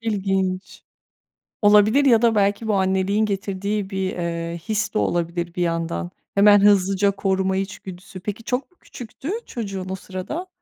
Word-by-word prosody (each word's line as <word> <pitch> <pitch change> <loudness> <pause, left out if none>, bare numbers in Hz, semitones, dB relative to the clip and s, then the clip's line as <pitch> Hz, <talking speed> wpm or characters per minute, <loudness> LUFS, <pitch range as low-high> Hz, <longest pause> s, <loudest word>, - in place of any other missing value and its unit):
İlginç. 195 -4 -2 0.8
Olabilir 210 +6 +5
ya 235 -4 +5
da 230 -2 +3
belki 205 +2 +1
bu 215 - +1
anneliğin 190 +2 +1
getirdiği 200 0 -2
bir, 190 -1 -2
eee, 170 -1 -3
his 220 +1 -1
de - - 0
olabilir 170 0 -1
bir 180 - -2
yandan. 165 - -2 0.2
Hemen 205 +1 +7
hızlıca 200 0 +4
koruma 190 -1 0
içgüdüsü. 190 -1 -7
Peki, 210 +4 -6
çok 250 +8 -3
mu 360 - -32
küçüktü 255 +6 -8
çocuğun 195 -5 -5
o 190 - -2
sırada? 190 - -6
195 Hz, 145 wpm, -22 LUFS, 185-210 Hz, 0.8 s, Hemen